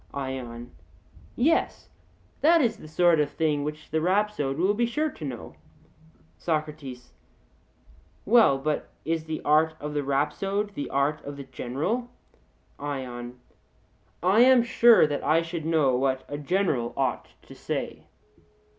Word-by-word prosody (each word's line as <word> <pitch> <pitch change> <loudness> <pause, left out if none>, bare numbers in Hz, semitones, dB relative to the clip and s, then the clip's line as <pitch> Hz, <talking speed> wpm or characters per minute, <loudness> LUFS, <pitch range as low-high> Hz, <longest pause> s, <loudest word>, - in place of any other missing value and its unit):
ION: 125 -3 -5 0.6
Yes, 310 +7 +1 0.5
that 335 +3 +5
is 230 -7 +1
the - - -12
sort 170 +1 +3
of 150 -1 +1
thing 150 -2 0
which 150 +1 -6
the 160 - 0
rhapsode 185 -6 0
will 185 +5 +2
be 235 +3 +1
sure 300 +6 -1
to 160 - -11
know. 130 -5 -7 0.8
SOCRATES: 150 -6 -4 1.1
Well, 220 - +5
but 150 +3 -2 0.2
is 160 0 -1
the 160 -1 -5
art 155 +2 +3
of 150 0 -5
the 145 - 0
rhapsode 195 +9 -1
the 145 - -5
art 140 +3 0
of 145 0 -7
the 140 - -7
general? 145 - -3 0.7
ION: 125 -4 -6 0.8
I 190 +5 +4
am 250 0 +7
sure 235 -3 +6
that 145 -1 -3
I 160 +3 +3
should 165 -1 -5
know 150 -6 +3
what 130 +1 0
a 145 - -5
general 150 -7 0
ought - - -1 0.2
to - - -13
say. - - -5
155 Hz, 140 wpm, -26 LUFS, 140-195 Hz, 1.1 s, am